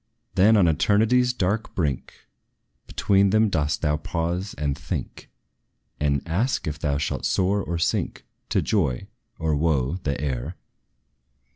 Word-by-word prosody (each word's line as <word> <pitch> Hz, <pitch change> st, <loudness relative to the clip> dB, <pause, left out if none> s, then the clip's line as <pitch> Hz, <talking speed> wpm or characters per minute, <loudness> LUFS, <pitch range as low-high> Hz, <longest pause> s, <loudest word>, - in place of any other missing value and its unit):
Then, 105 Hz, +4 st, +5 dB
on 95 Hz, -4 st, +5 dB
eternity's 110 Hz, +10 st, +3 dB
dark 105 Hz, -1 st, -2 dB
brink, 75 Hz, -8 st, -3 dB, 0.6 s
Between 100 Hz, 0 st, +2 dB
them 110 Hz, +2 st, +3 dB
dost 75 Hz, -5 st, -1 dB
thou 75 Hz, -1 st, +2 dB
pause, 85 Hz, +5 st, -3 dB
and 70 Hz, -2 st, -1 dB
think, -, -, -6 dB, 0.7 s
And 70 Hz, 0 st, 0 dB
ask, 105 Hz, +11 st, 0 dB
if 75 Hz, +1 st, -4 dB
thou 70 Hz, -3 st, 0 dB
shalt 70 Hz, -, -2 dB
soar 100 Hz, +2 st, +1 dB
or 85 Hz, -, -3 dB
sink 85 Hz, -, -1 dB, 0.2 s
To -, -, +1 dB
joy 75 Hz, -, 0 dB, 0.3 s
or 80 Hz, -1 st, 0 dB
wo 75 Hz, 0 st, +1 dB
the 70 Hz, -5 st, -2 dB
heir. 70 Hz, +3 st, -3 dB
85 Hz, 135 wpm, -24 LUFS, 75-100 Hz, 0.7 s, Then